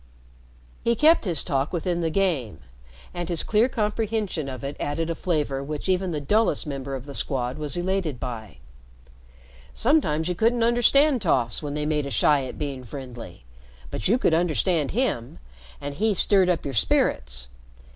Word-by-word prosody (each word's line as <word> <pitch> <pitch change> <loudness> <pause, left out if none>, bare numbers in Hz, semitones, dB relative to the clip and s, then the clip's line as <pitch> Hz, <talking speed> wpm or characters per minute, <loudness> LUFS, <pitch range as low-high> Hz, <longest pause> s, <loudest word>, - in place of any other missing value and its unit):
He 235 - +2
kept 310 +2 +5
his 170 -6 +1
talk 135 0 -1
within 175 0 -1
the 165 - 0
game, 155 - -1 0.5
and 175 -1 -4
his 170 -2 0
clear 225 +4 +3
comprehension 210 - -1
of 130 -2 -7
it 140 +1 -4
added 160 +3 -2
a - - 0
flavor 150 -5 -1
which 150 +3 -5
even 185 0 +1
the 155 -3 -2
dullest 210 +11 +1
member 140 -2 -4
of 130 0 -7
the 140 - -8
Squad 130 0 -2
was 150 +3 -1
elated 175 -7 -1
by. 115 - -6 1.2
Sometimes 200 - +2
you 180 - 0
couldn't 230 +5 +2
understand 245 +3 +4
toffs 120 - +1
when 145 -1 -4
they 150 0 -2
made 150 -2 0
a - - -4
shy 140 +3 +3
at 130 - -8
being 140 -3 -4
friendly, 120 - -9 0.5
but - - -2
you 225 +6 +4
could 170 - +2
understand 160 - +1
him, 205 - -1 0.4
and 145 0 -5
he 210 +6 +1
stirred 190 0 +4
up 175 - 0
your 140 - -3
spirits. - - 0
155 Hz, 170 wpm, -25 LUFS, 135-195 Hz, 1.2 s, kept